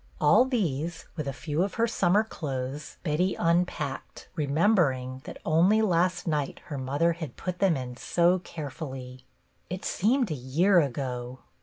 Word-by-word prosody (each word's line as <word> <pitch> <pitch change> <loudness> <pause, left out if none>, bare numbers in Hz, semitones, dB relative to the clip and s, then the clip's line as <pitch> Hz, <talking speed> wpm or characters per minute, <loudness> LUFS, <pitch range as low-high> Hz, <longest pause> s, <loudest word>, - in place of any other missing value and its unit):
All 205 +12 +6
these, 170 - -2
with 155 -4 -4
a - - 0
few 145 +4 -2
of 195 +1 -1
her 230 - +3
summer 205 -2 +2
clothes, 140 -7 -5
Betty 175 +4 0
un 170 +1 +3
packed, 140 -6 -6
remembering 140 -5 +1
that - - -8
only 185 +8 +4
last 180 -1 +1
night 150 -5 -1
her 145 - -5
mother 145 +6 +1
had 160 -7 -7
put 180 -1 -4
them 190 -6 +3
in 125 -1 -6
so 175 +6 +2
carefully. 135 -6 -7 0.4
It 185 +2 -5
seemed 235 - +1
a - - +1
year 155 +9 +3
ago 130 -3 -3
160 Hz, 155 wpm, -27 LUFS, 135-180 Hz, 0.4 s, All